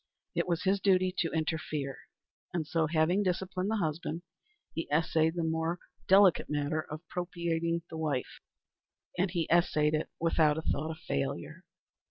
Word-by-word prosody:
It -, -, 0 dB
was 170 Hz, -1 st, 0 dB
his 195 Hz, +1 st, +2 dB
duty 185 Hz, -1 st, +3 dB
to 165 Hz, -, +1 dB
interfere; 155 Hz, -3 st, -2 dB, 0.6 s
and 165 Hz, -3 st, 0 dB
so, 160 Hz, +1 st, +1 dB
having 160 Hz, +5 st, +2 dB
disciplined 185 Hz, 0 st, -1 dB
the 220 Hz, -, +1 dB
husband, 165 Hz, -2 st, -2 dB, 0.5 s
he 165 Hz, -, -4 dB
essayed 160 Hz, +1 st, +2 dB
the 170 Hz, -, -1 dB
more 160 Hz, +1 st, 0 dB, 0.3 s
delicate 190 Hz, -1 st, +6 dB
matter 150 Hz, +1 st, 0 dB
of 155 Hz, +2 st, -9 dB
propitiating 170 Hz, -1 st, -1 dB
the 160 Hz, -, -7 dB
wife. 145 Hz, -5 st, -2 dB, 0.8 s
And 190 Hz, +1 st, +3 dB
he 170 Hz, -2 st, -1 dB
essayed 155 Hz, -3 st, +3 dB
it 155 Hz, -, 0 dB
without 160 Hz, -2 st, +3 dB
a 160 Hz, -, -3 dB
thought 155 Hz, +1 st, -1 dB
of 160 Hz, -, -5 dB
failure. 70 Hz, -, -3 dB
165 Hz, 155 wpm, -31 LUFS, 155-175 Hz, 0.8 s, delicate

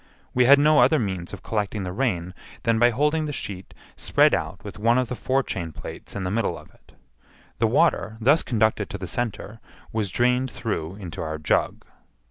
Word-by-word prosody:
We 125 Hz, 0 st, +4 dB
had 140 Hz, +3 st, +8 dB
no 150 Hz, +1 st, +5 dB
other 155 Hz, -, +5 dB
means 95 Hz, -7 st, -3 dB
of 100 Hz, -2 st, -9 dB
collecting 105 Hz, -2 st, -2 dB
the 90 Hz, -, -4 dB
rain 95 Hz, -7 st, -1 dB, 0.3 s
than 115 Hz, -1 st, +2 dB
by 120 Hz, +1 st, +6 dB
holding 150 Hz, +6 st, +1 dB
the 150 Hz, -, -3 dB
sheet 95 Hz, -8 st, -6 dB, 0.2 s
spread -, -, +3 dB
out -, -, -2 dB
with -, -, -9 dB
one 115 Hz, +3 st, +3 dB
of 130 Hz, -2 st, 0 dB
the 125 Hz, -, -3 dB
forechain 120 Hz, -11 st, -1 dB
plates -, -, -9 dB
in 100 Hz, -, -3 dB
the 90 Hz, -, -2 dB
middle 115 Hz, 0 st, 0 dB
of -, -, -15 dB
it. -, -, -25 dB, 0.7 s
The -, -, +3 dB
water, 110 Hz, +3 st, +2 dB
thus 140 Hz, +8 st, +4 dB
conducted 110 Hz, -3 st, 0 dB
to 100 Hz, -, -5 dB
the 95 Hz, -, -6 dB
centre, 115 Hz, +2 st, -4 dB, 0.3 s
was 110 Hz, -3 st, -1 dB
drained 125 Hz, +5 st, +1 dB
through 95 Hz, -8 st, -4 dB
into 90 Hz, -5 st, -7 dB
our 80 Hz, -1 st, -3 dB
jug. 75 Hz, -, 0 dB
110 Hz, 195 wpm, -24 LUFS, 95-125 Hz, 0.7 s, had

